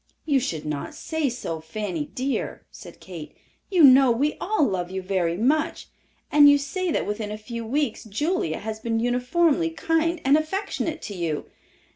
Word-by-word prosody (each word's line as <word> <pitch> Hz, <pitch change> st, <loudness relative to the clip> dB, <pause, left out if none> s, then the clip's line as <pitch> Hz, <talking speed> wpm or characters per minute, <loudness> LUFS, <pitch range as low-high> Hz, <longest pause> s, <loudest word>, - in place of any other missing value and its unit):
"You 285 Hz, -3 st, +3 dB
should 165 Hz, -, -3 dB
not 150 Hz, -2 st, -4 dB
say 320 Hz, -3 st, -1 dB
so, 230 Hz, -9 st, -4 dB
Fanny 170 Hz, -1 st, -4 dB
dear," 265 Hz, +2 st, -3 dB
said -, -, -12 dB
Kate. 170 Hz, -5 st, -10 dB, 0.3 s
"You 365 Hz, -5 st, +4 dB
know 265 Hz, -1 st, +8 dB
we 275 Hz, +6 st, +1 dB
all 405 Hz, -6 st, +2 dB
love 180 Hz, -6 st, -2 dB
you 190 Hz, +1 st, -3 dB
very 185 Hz, -3 st, -1 dB
much, 305 Hz, -, 0 dB, 0.4 s
and 290 Hz, -1 st, +8 dB
you 285 Hz, -, +6 dB
say 350 Hz, +7 st, -3 dB
that -, -, 0 dB
within 210 Hz, 0 st, -3 dB
a 210 Hz, -, -4 dB
few 230 Hz, +2 st, -6 dB
weeks 255 Hz, 0 st, -1 dB
Julia 220 Hz, -, -1 dB
has 220 Hz, 0 st, -5 dB
been 225 Hz, 0 st, -1 dB
uniformly 290 Hz, +8 st, +2 dB
kind 325 Hz, +1 st, 0 dB
and 275 Hz, +2 st, +6 dB
affectionate 330 Hz, -1 st, -3 dB
to 205 Hz, -, -5 dB
you." 165 Hz, -5 st, -3 dB
250 Hz, 170 wpm, -24 LUFS, 200-310 Hz, 0.4 s, know